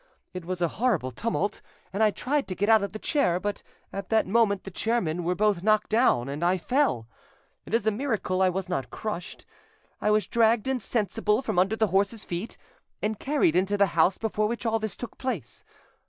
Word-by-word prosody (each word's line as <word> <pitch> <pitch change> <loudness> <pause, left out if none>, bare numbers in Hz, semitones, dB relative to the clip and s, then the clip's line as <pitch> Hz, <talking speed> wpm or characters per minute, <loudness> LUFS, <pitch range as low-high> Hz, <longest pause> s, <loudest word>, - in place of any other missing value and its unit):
It 180 -2 -6
was 180 0 -2
a - - +3
horrible 195 - +1
tumult, 210 - -2 0.3
and 200 - -1
I 215 - +6
tried 270 +8 -1
to 185 - -4
get 205 +4 0
out 220 -1 +6
of 200 - -3
the 215 - -6
chair, 215 - +1
but 205 +2 -3 0.3
at 195 -1 -5
that 220 -1 +3
moment 200 -1 +2
the 195 - -8
chairmen 180 -6 -1
were 180 +2 0
both 210 -2 +2
knocked 215 +2 +2
down, 215 - +3
and 145 +4 -4
I 180 +2 +3
fell. 250 - 0 0.6
It - - -8
is 230 - 0
a 220 - +3
miracle 210 -6 -1
I 190 - +5
was 185 0 -3
not 135 -9 -3
crushed. 210 - -6 0.6
I - - +1
was 210 0 +3
dragged 230 0 +2
insensible 225 -2 0
from 180 - 0
under 195 +4 +2
the 220 -1 +1
horses' 200 +3 +1
feet 175 +6 -5 0.5
and 215 -1 -1
carried 275 - +2
into 195 +3 +2
the 200 - +5
house 170 +3 +3
before 215 -1 0
which 235 +2 -4
all 225 0 +1
this 215 -3 -4
took 245 - -8
place. 200 - -4
205 Hz, 205 wpm, -27 LUFS, 185-225 Hz, 0.6 s, I